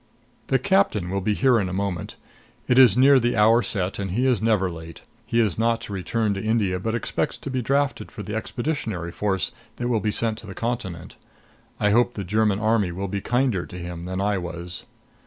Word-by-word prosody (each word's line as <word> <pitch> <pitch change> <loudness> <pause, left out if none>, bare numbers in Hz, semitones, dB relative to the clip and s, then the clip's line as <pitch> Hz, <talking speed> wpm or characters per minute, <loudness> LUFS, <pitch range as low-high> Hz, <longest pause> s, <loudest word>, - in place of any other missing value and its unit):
The 135 - +3
captain 190 - +1
will 100 0 -1
be 105 +2 0
here 130 -1 +4
in 95 -3 -1
a - - -5
moment. 95 -2 -3 0.5
It 125 - +4
is 125 -4 +7
near 135 +1 +7
the 120 -1 0
hour 110 +3 +5
set 95 -4 -2
and 100 -1 -3
he 120 +8 0
is 125 -6 +2
never 110 -4 +2
late. 80 0 -10 0.2
He 115 - +1
is 110 -3 +1
not 115 0 +2
to 100 - -7
return 105 +3 -1
to 95 - -4
India, 105 -5 +1
but 110 +4 -2
expects 115 - -2
to 140 - -7
be 130 -1 -1
drafted 140 +3 0
for 105 - -7
the 105 - -6
Expeditionary 110 - -3
Force 95 -1 -1 0.2
that 120 0 -3
will 115 -3 +2
be 105 - -1
sent 110 +1 0
to 110 - -12
the 95 - -8
Continent. 115 -8 -4 0.6
I 105 - +3
hope 120 +2 +3
the 100 - -4
German 105 +1 +1
Army 110 -3 +1
will 95 +3 -4
be 100 0 -3
kinder 120 -6 0
to 90 - -9
him 85 -1 -6
than 95 +1 -4
I 100 0 +1
was! 85 0 -5
105 Hz, 215 wpm, -24 LUFS, 95-120 Hz, 0.6 s, is